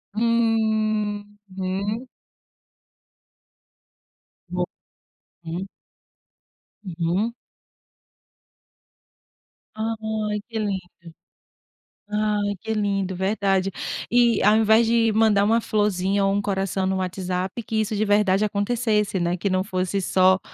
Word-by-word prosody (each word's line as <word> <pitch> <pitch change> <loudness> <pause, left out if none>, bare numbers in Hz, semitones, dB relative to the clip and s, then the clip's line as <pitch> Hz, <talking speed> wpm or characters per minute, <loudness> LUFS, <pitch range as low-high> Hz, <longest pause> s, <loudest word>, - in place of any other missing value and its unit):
Uhum. 215 -2 -1 2.4
Bom, - - -1 0.8
hum. 170 +4 -4 1.2
Uhum. 180 +5 -1 2.4
Ai 220 -1 -2
que 225 -1 -3
lindo, 185 -5 -5 0.9
ah, 210 0 0 0.2
que 220 - -2
lindo 195 -3 -1
verdade, 195 0 +1 0.4
e 235 -3 +4
ao 210 +2 +6
invés 220 +1 +5
de 230 -1 +3
mandar 215 -2 +4
uma 225 +3 +3
florzinha, 200 -3 +1
ou 195 - +2
um 200 - +1
coração 195 -1 -1
no 190 0 0
WhatsApp, 185 +3 -3
que 220 - -3
isso 215 0 -2
de 215 +1 +1
verdade 205 0 +3
acontecesse, 210 -1 0
né, 175 +1 0
que 200 - -1
não 185 0 +1
fosse 185 0 -1
só 185 0 +4
205 Hz, 95 wpm, -23 LUFS, 190-220 Hz, 2.4 s, ao